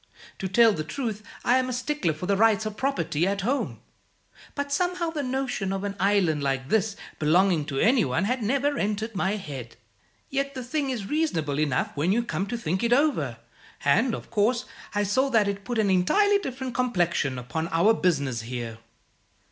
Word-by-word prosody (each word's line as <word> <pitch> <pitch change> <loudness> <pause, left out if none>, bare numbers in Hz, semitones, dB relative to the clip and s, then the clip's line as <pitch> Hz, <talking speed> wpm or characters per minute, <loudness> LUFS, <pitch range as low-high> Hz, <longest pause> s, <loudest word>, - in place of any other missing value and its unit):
To 190 - -2
tell 225 +3 +5
the 155 - -3
truth, 215 - -4 0.2
I'm 255 +1 +3
a - - -2
stickler 250 - -1
for 155 - -6
the 200 +1 +2
rights 220 +1 +3
of 215 -1 -4
property, 215 - 0
at 200 0 -1
home; 260 +8 -1 0.7
but 285 -1 -3
somehow 355 +2 0
the 310 -2 -3
notion 255 -7 -2
of 195 0 -2
an 200 -1 -3
island 190 -7 +2
like 135 -1 -1
this 220 -1 +1 0.2
belonging 165 +1 +3
to 140 -2 -4
any 235 - +4
one 145 +5 0
had 250 +5 0
never 275 +6 +1
entered 215 +2 -1
my 195 +1 0
head. 145 -11 -7 0.6
Yet 275 0 -1
the 255 - -4
thing 275 +3 -2
is 235 -6 -3
reasonable 170 - -1
enough 145 -5 0
when 155 +5 +1
you 235 +4 +2
come 195 -3 -2
to 240 - -3
think 185 -2 -2
it 235 0 +3
over; 245 - +1 0.5
and, 225 - +3
of - - -10
course, 235 +3 +1 0.3
I 205 - +2
saw 260 +8 +1
that 220 -5 +3
it 200 0 -3
put 240 -2 -2
an 210 -3 +2
entirely 400 - +4
different 260 -7 -5
complexion 175 - 0
upon 160 +7 -3
our 170 +7 +4
business 140 - 0
here." 115 -1 -6
205 Hz, 190 wpm, -26 LUFS, 165-255 Hz, 0.7 s, tell